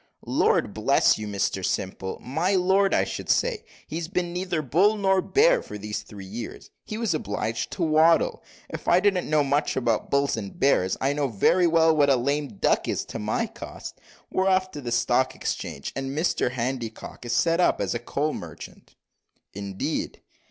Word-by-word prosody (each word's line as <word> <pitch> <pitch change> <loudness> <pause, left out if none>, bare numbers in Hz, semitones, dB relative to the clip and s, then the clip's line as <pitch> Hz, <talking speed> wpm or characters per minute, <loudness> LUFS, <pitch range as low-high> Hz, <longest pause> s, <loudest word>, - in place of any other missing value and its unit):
"Lord - - +2
bless - - +3
you, 105 - -5
Mr 100 -2 -1
Simple 95 +1 -3
my 165 +9 0
lord, 190 +2 +3
I - - +3
should - - -6
say 475 -3 +1 0.2
he's 165 0 -4
been 175 -1 -2
neither 180 -3 -2
bull 185 - +3
nor 195 -2 +2
bear 485 - +3
for - - -8
these 105 +1 -4
three 100 -2 -11
years. 110 +4 -8
He 215 - -6
was 225 -6 0
obliged 110 -5 -2
to 175 - -2
waddle; 160 +1 +3 0.3
if - - -8
I 175 - +5
didn't 190 -4 +1
know 155 -1 +3
much 145 +2 0
about 120 -4 0
bulls 140 0 +2
and 100 -3 -7
bears, 95 -9 +2
I 135 +2 +1
know 145 -1 0
very 150 - +3
well 160 -1 +4
what 145 -2 +4
a 135 - +5
lame 140 +4 0
duck - - +1
is - - -1
to - - -7
my - - -1
cost. - - -9 0.3
We're 190 +1 +1
off 185 0 +2
the 130 -5 -6
Stock 125 +2 +1
Exchange, 70 - -4
and 135 +1 -4
Mr 160 -5 +1
Handycock 125 -2 -5
is 120 0 -3
set 165 +4 +2
up 180 - +3
as - - -1
a 120 - -2
coal 145 +5 -2
merchant." 80 -3 -10 0.6
"Indeed!" 100 -1 -4
145 Hz, 180 wpm, -25 LUFS, 115-180 Hz, 0.6 s, I